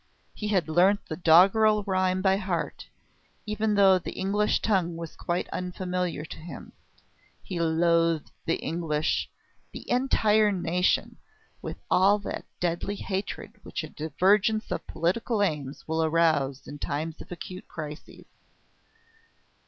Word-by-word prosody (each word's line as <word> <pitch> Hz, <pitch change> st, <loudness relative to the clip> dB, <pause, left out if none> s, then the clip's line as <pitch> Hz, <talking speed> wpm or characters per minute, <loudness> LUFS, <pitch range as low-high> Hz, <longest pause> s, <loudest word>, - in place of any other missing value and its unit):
He 210 Hz, -, -5 dB
had 190 Hz, -6 st, +1 dB
learnt 180 Hz, +6 st, +3 dB
the 155 Hz, -, -5 dB
doggerel 195 Hz, +6 st, +5 dB
rhyme 185 Hz, -1 st, 0 dB
by 190 Hz, -1 st, +4 dB
heart, 185 Hz, -4 st, -3 dB, 0.6 s
even 215 Hz, 0 st, 0 dB
though 195 Hz, -2 st, +6 dB
the -, -, -6 dB
English 205 Hz, +2 st, +1 dB
tongue 180 Hz, -6 st, 0 dB
was 165 Hz, -1 st, -7 dB
quite 175 Hz, +1 st, -2 dB
unfamiliar 180 Hz, -3 st, -3 dB
to -, -, -9 dB
him. 165 Hz, +2 st, -9 dB, 0.7 s
He 180 Hz, -3 st, -5 dB
loathed 165 Hz, -1 st, +2 dB, 0.2 s
the 165 Hz, -, +2 dB
English 160 Hz, -1 st, -1 dB, 0.4 s
the -, -, -9 dB
entire 220 Hz, -4 st, +3 dB
nation 180 Hz, -1 st, 0 dB, 0.4 s
with -, -, -6 dB
all 195 Hz, +3 st, +5 dB
that 205 Hz, -, -6 dB
deadly 175 Hz, +3 st, -1 dB
hatred 195 Hz, 0 st, -5 dB
which -, -, -5 dB
a -, -, -7 dB
divergence 200 Hz, -, +1 dB
of -, -, -3 dB
political 205 Hz, +6 st, 0 dB
aims 150 Hz, -7 st, -3 dB
will 160 Hz, 0 st, 0 dB
arouse 155 Hz, -4 st, +1 dB
in 145 Hz, -, -8 dB
times 155 Hz, +3 st, -3 dB
of -, -, -13 dB
acute 180 Hz, +1 st, -8 dB
crises. 150 Hz, -2 st, -8 dB
180 Hz, 130 wpm, -27 LUFS, 165-200 Hz, 0.7 s, though